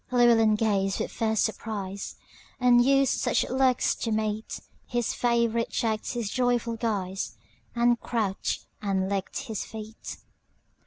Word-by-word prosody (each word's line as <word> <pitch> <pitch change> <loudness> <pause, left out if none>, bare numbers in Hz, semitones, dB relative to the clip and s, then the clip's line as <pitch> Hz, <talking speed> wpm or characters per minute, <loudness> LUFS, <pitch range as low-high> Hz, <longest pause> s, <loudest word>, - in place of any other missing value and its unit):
Llewelyn 235 -3 +5
gazed 200 -3 +1
with - - -2
fierce 220 -2 0
surprise; 200 -3 -3 0.4
Unused 250 +2 +4
such - - +1
looks 260 -1 +3
to 230 - -2
meet, 215 0 -2 0.3
His 240 -2 -1
favorite 235 -1 +1
checked 220 -2 -1
his 235 -4 -3
joyful 245 -2 +1
guise, 200 -5 -2 0.4
And 240 0 +3
crouched 215 -5 -2 0.2
and 195 -2 0
licked 195 -1 -2
his 225 -7 -4
feet. 220 0 -8
225 Hz, 120 wpm, -27 LUFS, 210-240 Hz, 0.4 s, Llewelyn